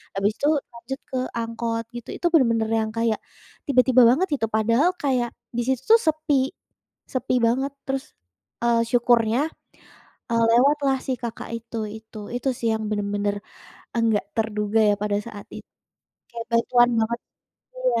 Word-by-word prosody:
Habis 200 +2 +2
itu 285 - +1 0.3
lanjut 235 +3 -7
ke 260 - -1 0.2
angkot 230 0 -2
gitu, 240 - -8
itu - - -7
bener-bener 230 -7 +3
yang 220 0 -3
kayak 230 -2 +1 0.5
tiba-tiba 255 -2 +5
banget 315 +10 +3
itu 225 - -1
padahal 230 +9 +3
kayak 250 -4 +1 0.3
di - - +2
situ 265 - +2
sepi 295 -4 +1 0.6
sepi 260 0 0
banget 265 +4 0 0.2
terus, 270 0 -2 0.6
eee, 235 -1 +3
syukurnya, 240 -1 +3 0.9
eee, 230 0 +3
lewatlah 275 +2 +3
si 265 - 0
kakak 235 -2 -5
itu 230 0 -7 0.2
itu. 220 0 -12 0.2
Itu 245 +2 -1
sih 230 - 0
yang 220 0 -3
bener-bener 205 -1 -1 0.7
nggak 215 -3 +1
terduga 215 -1 0
ya - - +4
pada 205 -1 0
saat 210 -3 -9
it - - -7 0.7
kaya 235 -1 -6
bantuan 240 +1 +4
banget. 235 +2 -1 0.6
Iya. - - +1
235 Hz, 145 wpm, -24 LUFS, 220-265 Hz, 0.9 s, tiba-tiba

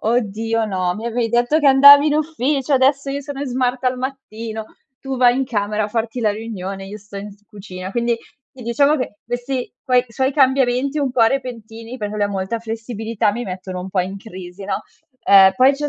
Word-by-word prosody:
"Oddio 225 0 0
no, 185 -3 -1
mi 225 +2 -6
avevi 235 0 -1
detto 240 +7 +2
che 285 - +5
andavi 285 +2 +8
in 295 - +1
ufficio, 290 -2 -1
adesso 275 +1 +3
io 280 +1 -2
sono 285 -1 -7
in 285 - -3
smart 255 0 -1
al 255 0 +1
mattino, 230 -4 -6 0.3
tu 270 -1 -5
vai 245 0 +4
in 270 - 0
camera 210 -3 -1
a - - -4
farti 225 +2 -3
la 215 -2 +2
riunione 195 -3 -6
io 210 +2 -8
sto 200 0 -10
in 205 +1 -7
s 205 +1 -19
cucina." 190 -1 -9
Quindi, 235 -1 0 0.3
sì, 260 -2 -12
diciamo 280 +6 +3
che 230 -5 -5
questi 245 +2 -4
quoi 250 -2 +3
suoi 260 +4 -1
cambiamenti 265 0 +2
un 270 -3 -1
po' 240 - +3
repentini, 230 -1 -2
perché 210 0 -4
lui 205 -1 0
ha - - -1
molta 195 +3 -3
flessibilità, 225 -1 -2
mi 240 +4 -4
mettono 185 -1 -6
un 185 +1 -6
po' 190 - +1
in 190 +2 -4
crisi, 190 -2 -10
no. 200 - -3 0.4
Uhm, 195 -1 +7
poi 260 +6 +5
c'è 295 +1 -3
230 Hz, 210 wpm, -19 LUFS, 205-265 Hz, 0.4 s, andavi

